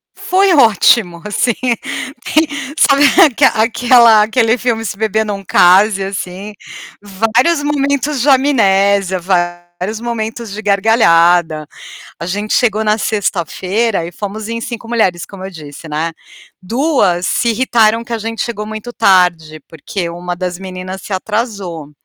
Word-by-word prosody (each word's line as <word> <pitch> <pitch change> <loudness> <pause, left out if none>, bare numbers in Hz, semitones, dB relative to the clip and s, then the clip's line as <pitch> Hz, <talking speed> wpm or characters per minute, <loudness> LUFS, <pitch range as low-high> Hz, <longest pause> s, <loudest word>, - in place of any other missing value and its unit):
Foi 380 0 +1
ótimo, 215 - +3
assim. 215 +3 0 0.8
E 285 -2 -1
sabe 280 +1 +4 0.2
aque 275 0 +2
aquela 230 -1 +4
aquele 225 +1 +1
filme 225 -2 -2
Se 200 - -5
beber 220 0 0
não 200 -1 -5
case, 195 +3 +4
assim. 195 +1 -6 0.5
Vários 225 - 0
momentos 280 -1 -1
de 285 - +1
amnésia, 200 -8 +2
vários 175 +3 -3
momentos 230 -2 -5
de 215 +2 -6
gargalhada. 175 -7 +2 0.5
A 170 - -6
gente 205 +4 -3
chegou 220 -4 +1
na 210 0 +2
sexta-feira 200 0 -2
e 175 - -9
fomos 210 +4 -6
em 230 0 -4
5 230 0 -7
mulheres, 190 -8 0
como 190 -1 -11
eu 195 - -6
disse, 155 -1 -11
né. 160 +2 -3 0.5
2 225 - 0
se 235 - 0
irritaram 230 -1 +1
que 235 - -9
a 230 - -1
gente 225 +1 -4
chegou 210 -3 -5
muito 220 +2 -7
tarde, 175 -7 +1
porque 170 +3 -5
1 175 +1 -6
das 180 -1 -4
meninas 185 0 -8
se 205 - -8
atrasou. 190 - -4
210 Hz, 140 wpm, -14 LUFS, 180-235 Hz, 0.8 s, sabe